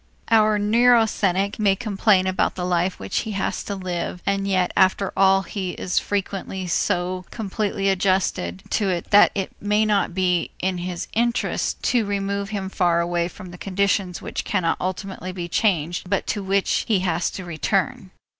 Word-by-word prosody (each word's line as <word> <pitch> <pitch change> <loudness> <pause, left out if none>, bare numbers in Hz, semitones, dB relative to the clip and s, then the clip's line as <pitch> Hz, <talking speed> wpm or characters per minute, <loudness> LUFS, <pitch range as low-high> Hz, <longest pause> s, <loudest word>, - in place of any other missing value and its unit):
Our 215 -1 +5
neurasthenic 210 -3 +3
may 200 -2 +3
complain 200 -3 +2
about 185 0 0
the 180 - -3
life 180 +1 0
which 95 0 -2
he 220 - -4
has 195 - -2
to 200 - -3
live 180 -2 -4
and 195 0 0
yet 185 -2 +1
after 190 +1 +2
all 195 0 +4
he 190 -2 -4
is 180 - 0
frequently 195 -1 -3
so 180 0 -1
completely 205 -2 -2
adjusted 185 - 0
to 205 -3 +1
it 175 -2 -3
that 205 - +7
it 195 -2 -2
may 210 +1 +2
not 205 -4 +1
be 180 -2 +1
in 185 -1 -1
his 175 -1 -4
interest 235 +2 0
to 245 -3 +2
remove 200 0 -2
him 200 -3 -3
far 175 -3 +1
away 170 0 0
from 180 0 -11
the 175 - -11
conditions 195 -2 0
which - - -4
cannot 180 -5 0
ultimately 185 0 -4
be 175 -2 -5
changed 175 -3 0
but 200 - 0
to 205 - -2
which 195 0 +1
he 205 -5 +2
has 175 -1 0
to 185 - -7
return. 195 +6 -1
190 Hz, 170 wpm, -23 LUFS, 180-205 Hz, -, that